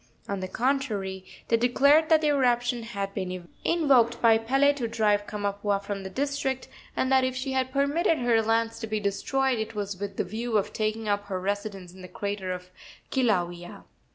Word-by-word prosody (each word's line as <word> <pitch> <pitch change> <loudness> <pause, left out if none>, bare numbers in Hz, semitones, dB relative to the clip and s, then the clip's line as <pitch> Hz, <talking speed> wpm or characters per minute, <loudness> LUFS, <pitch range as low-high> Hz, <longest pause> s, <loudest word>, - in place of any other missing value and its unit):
On 200 -1 -2
the 185 - -4
contrary, 215 -6 -1 0.3
they 230 - +4
declared 280 +6 +4
that 320 -1 +5
the 305 - +2
eruption 245 -3 +2
had 200 -4 -4
been 185 -3 -5 0.2
invoked 270 -8 +3
by 225 -1 +5
Pele 270 +5 +3
to 255 -5 -3
drive 210 -3 +1
Kamapuaa 205 -1 -1
from 200 0 -5
the 190 - -6
district, 270 +2 -2 0.3
and 260 - +1
that 265 -1 +5
if 255 0 -1
she 260 +1 -3
had 260 0 0
permitted 290 +5 +2
her 240 -2 +3
lands 225 +1 0
to 225 - -5
be 215 0 -1
destroyed 250 +5 0
it 220 0 -4
was 200 -2 -4
with 200 -1 -5
the - - +1
view 225 +3 -2
of 200 - -1
taking 215 0 -2
up 205 0 0
her 190 -2 -3
residence 195 -2 -4
in 185 - -13
the 185 - -9
crater 200 -1 -4
of 180 0 -7 0.4
Kilauea. 175 -9 -1
225 Hz, 190 wpm, -27 LUFS, 200-260 Hz, 0.4 s, that